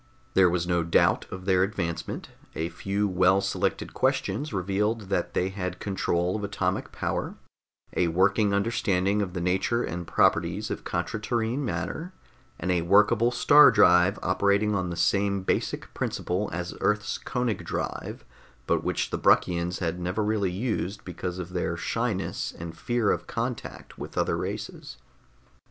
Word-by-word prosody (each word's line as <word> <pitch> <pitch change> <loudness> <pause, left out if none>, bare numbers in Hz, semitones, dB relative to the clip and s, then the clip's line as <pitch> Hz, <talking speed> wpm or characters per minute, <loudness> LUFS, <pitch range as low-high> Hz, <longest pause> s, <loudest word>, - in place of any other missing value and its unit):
There 95 -2 +5
was 85 -1 0
no 85 -1 +1
doubt 85 0 +2
of 95 0 -8
their 95 -1 +3
advancement; 85 -4 -3 0.3
a 80 +1 -2
few 100 +4 -1
well 95 +1 +4
selected 100 -1 -2
questions 150 +2 0
revealed 100 +2 -1
that 90 - -1
they 90 - +1
had 90 -2 -4
control 90 -2 -1
of 105 - -3
atomic 100 0 -2
power, - - -3 0.6
a 90 - +2
working 95 +5 +2
understanding 100 -1 +1
of 95 -3 -3
the 90 - -3
nature 95 +7 +1
and 85 +1 -5
properties - - +2
of - - -4
contra 110 - -2
terrene 115 +3 -1
matter, 125 - -3 0.5
and 90 - -1
a 90 -2 +2
workable 105 +6 +4
star 145 +4 +7
drive 90 +3 +5
operating 100 +3 +2
on 95 -3 -1
the 85 - -4
same 100 +1 +1
basic - - -2
principle 95 +4 -2
as 90 +1 -4
Earth's 105 0 0
Koenig 125 -4 -2
drive - - -4 0.4
but - - +1
which - - -1
the - - -2
Bruckians 85 0 +2
had 85 0 -1
never 90 +5 -1
really 105 -2 +1
used 100 0 -3
because 90 0 -5
of 90 0 -6
their 85 -2 -1
shyness 115 -1 -2
and 85 0 -7
fear 120 0 0
of - - -2
contact 120 +1 -5
with - - -8
other - - +1
races. - - -5
95 Hz, 155 wpm, -27 LUFS, 90-105 Hz, 0.6 s, star